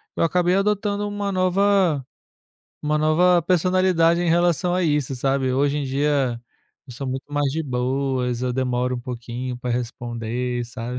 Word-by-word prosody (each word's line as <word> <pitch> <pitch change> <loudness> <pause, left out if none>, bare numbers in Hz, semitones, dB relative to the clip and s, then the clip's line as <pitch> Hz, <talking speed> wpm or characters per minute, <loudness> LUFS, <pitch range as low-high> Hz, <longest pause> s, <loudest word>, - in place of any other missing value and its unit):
eu - - +1
acabei 180 +2 +2
adotando 205 +1 0
uma 205 -1 -3
nova 185 -5 +2 0.8
uma 150 0 +1
nova 170 +4 +4
personalidade 180 -1 +2
em 175 - 0
relação 175 +1 +2
a 185 - +1
isso, 145 -5 0
sabe. 135 0 0
Hoje 140 +2 +1
em 145 - -2
dia 135 -3 0 0.5
eu 130 - -10
sou 135 +2 -5
muito 135 +3 -5
mais 145 -1 +1
de 160 +2 -2
boas, 125 -1 -1
eu 125 -1 0
demoro 125 0 -1
um - - -6
pouquinho 125 0 -5
pra 125 0 -4
responder, 120 0 -3
sabe. 120 +1 -6
140 Hz, 160 wpm, -22 LUFS, 125-175 Hz, 0.8 s, nova